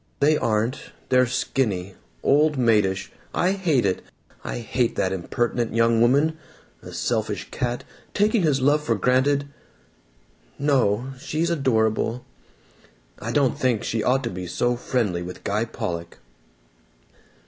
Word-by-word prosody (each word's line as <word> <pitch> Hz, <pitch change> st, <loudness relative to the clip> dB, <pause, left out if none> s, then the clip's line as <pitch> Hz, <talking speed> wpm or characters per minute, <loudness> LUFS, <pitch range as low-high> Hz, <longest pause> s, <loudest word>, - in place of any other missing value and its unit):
They 150 Hz, +2 st, +4 dB
aren't. 115 Hz, +5 st, -1 dB, 0.2 s
They're 125 Hz, -1 st, +4 dB
skinny. 105 Hz, -6 st, -1 dB, 0.3 s
Old 150 Hz, +1 st, +3 dB
maidish. 105 Hz, -6 st, +2 dB, 0.2 s
I 180 Hz, -, +2 dB
hate 170 Hz, -, +1 dB
it! 95 Hz, -2 st, 0 dB, 0.4 s
I -, -, -4 dB
hate 120 Hz, +1 st, -1 dB
that 95 Hz, -, 0 dB
impertinent 115 Hz, +5 st, -1 dB
young 115 Hz, 0 st, +3 dB
woman! 145 Hz, +6 st, +3 dB, 0.4 s
A -, -, -10 dB
selfish -, -, -2 dB
cat, 120 Hz, 0 st, -2 dB, 0.3 s
taking 210 Hz, +1 st, +3 dB
his 145 Hz, -5 st, +2 dB
love 145 Hz, +3 st, +3 dB
for 115 Hz, -6 st, +1 dB
granted.... 130 Hz, +6 st, +2 dB, 1.1 s
No, 130 Hz, -4 st, +1 dB
she's 160 Hz, +5 st, -1 dB
adorable.... 115 Hz, -5 st, +1 dB, 0.9 s
I 115 Hz, -, -4 dB
don't 135 Hz, -1 st, +1 dB
think 125 Hz, -4 st, +1 dB
she 110 Hz, -, -1 dB
ought 130 Hz, +5 st, +2 dB
to 115 Hz, -, -2 dB
be 90 Hz, 0 st, -6 dB
so 120 Hz, +7 st, 0 dB
friendly 115 Hz, -7 st, -1 dB
with 90 Hz, +1 st, -8 dB
Guy 105 Hz, +3 st, 0 dB
Pollock." 85 Hz, -6 st, -5 dB
120 Hz, 130 wpm, -24 LUFS, 110-140 Hz, 1.1 s, They